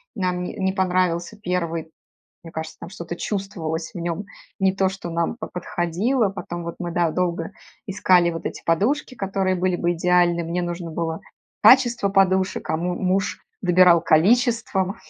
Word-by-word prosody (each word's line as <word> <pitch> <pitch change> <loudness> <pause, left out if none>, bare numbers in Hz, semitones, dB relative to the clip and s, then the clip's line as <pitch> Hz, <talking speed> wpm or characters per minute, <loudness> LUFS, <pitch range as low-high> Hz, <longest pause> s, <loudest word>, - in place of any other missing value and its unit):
нам 180 -3 -1
не - - -5
не 190 0 0
понравился 185 0 0
первый. 170 -4 -3 0.5
Мне 165 - -10
кажется, 160 0 -6
там, - - -8
что-то 175 -1 -7
чувствовалось 170 -5 -4
в - - -7
нём 170 +4 -3 0.3
не 190 -1 +3
то, 190 -1 +2
что 190 -2 -7
нам 170 0 0
бы 235 - -16
по - - -5
подходило. 190 +7 0
Потом 175 -3 -6
вот 170 0 -5
мы, 175 -1 -4
да, 170 -1 +1
долго 170 0 -1 0.4
искали 185 -3 +3
вот, 165 - -7
эти - - -5
подушки, 245 - 0
которые 195 -2 -1
были 185 0 0
бы 175 0 0
идеальны, 175 0 +2
мне 170 +2 -2
нужно 175 -1 -4
было 165 0 -3 0.4
качество 240 -5 +5
подушек, 190 -1 +1
а 160 - +1
му 175 +2 -2
муж 185 +1 0 0.2
добирал 180 -2 +5
количеством. 200 - +2
180 Hz, 165 wpm, -23 LUFS, 170-195 Hz, 0.5 s, качество